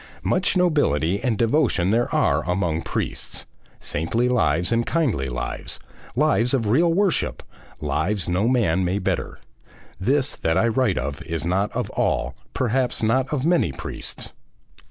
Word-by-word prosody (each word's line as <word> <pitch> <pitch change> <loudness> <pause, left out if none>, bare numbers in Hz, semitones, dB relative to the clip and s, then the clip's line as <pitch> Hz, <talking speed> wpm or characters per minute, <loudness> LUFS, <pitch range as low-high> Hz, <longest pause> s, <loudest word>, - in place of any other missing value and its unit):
Much 185 +1 +1
nobility 100 - +2
and 120 -5 +1
devotion 115 - +2
there 120 +2 +1
are - - +2
among 90 -3 0
priests, - - -3 0.3
saintly 115 +11 0
lives 90 -8 +2
and 115 0 +1
kindly 115 - 0
lives, - - -4 0.4
lives 135 -3 +3
of 115 -5 -1
real 165 +9 +4
worship, 190 0 +1 0.4
lives 95 +4 -1
no 90 +5 +1
man 100 -8 +2
may 90 +2 0
better; 100 - -2 0.6
this 135 +7 +1
that 80 0 0
I 115 - +3
write 115 -3 +1 0.3
is 80 0 -3
not 95 +4 +1
of - - -2
all, 65 +1 0 0.2
perhaps 125 0 0
not 130 +4 +2
of 145 -2 -1
many 170 - +3
priests. 65 - -5
115 Hz, 140 wpm, -23 LUFS, 90-130 Hz, 0.6 s, real